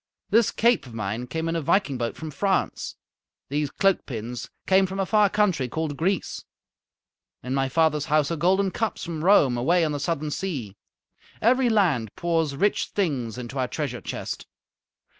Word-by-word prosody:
This 230 0 +5
cape 235 - +2
of 115 - -11
mine 110 +3 -3
came 160 +6 -3
in 165 - -1
a 165 - 0
viking 155 -4 +1
boat 115 -1 -2
from 160 -1 -6
France. 190 +6 -1 0.5
These 145 +1 -1
cloak 195 +5 +1
pins 120 -1 -5 0.2
came 190 0 +4
from 190 +1 -5
a 195 - +1
far 210 0 +4
country 185 -11 +1
called 160 +1 -3
Greece. 180 +4 -1 1.0
In 125 - -3
my 135 -1 +1
father's 150 0 +2
house 155 0 +2
are - - 0
golden 190 +4 +2
cups 225 +1 -2
from 160 -2 -4
Rome, 150 -10 +5
away 165 +7 +3
on 155 - -1
the 145 - -2
southern 155 0 -2
sea. 140 - -4 0.6
Every 250 +2 +3
land 165 - +1
pours 165 -4 0
rich 200 +8 +1
things 135 - -2
into 125 +2 -5
our 130 - +1
treasure 130 -3 -4
chest. - - -5
160 Hz, 175 wpm, -25 LUFS, 130-190 Hz, 1.0 s, This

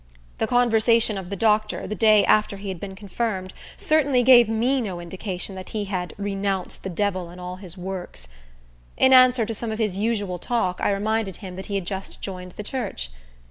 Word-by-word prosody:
The - - +1
conversation 230 -2 +3
of 190 -2 -6
the 200 - -3
doctor, 215 +1 +1
the - - -4
day 215 -2 +5
after 210 -1 +3
he 195 0 -6
had 185 -3 -5
been 195 0 -7
confirmed, 195 -1 -3 0.2
certainly 285 -5 +3
gave 240 -3 +7
me 245 +4 +1
no 190 -6 -4
indication 185 +2 -5
that 185 -1 -8
he 210 -2 -3
had 185 -3 -4
"renounced 195 -2 -2
the 190 - -5
devil 185 -1 -1
and 175 +1 -11
all 180 0 -6
his 185 -1 -8
works." 180 - -6 0.7
In 260 - +5
answer 255 -2 +6
to 225 - -4
some 225 +1 -4
of 220 - -3
his 210 -4 -1
usual 205 -5 -1
talk, 185 -4 -1
I - - +2
reminded 210 -1 -1
him 185 -2 -8
that 190 - -6
he 200 - -3
had 195 -3 -2
just 190 +1 -5
joined 180 -2 -6
the 210 - -7
church. 200 - -4
200 Hz, 200 wpm, -24 LUFS, 185-225 Hz, 0.7 s, gave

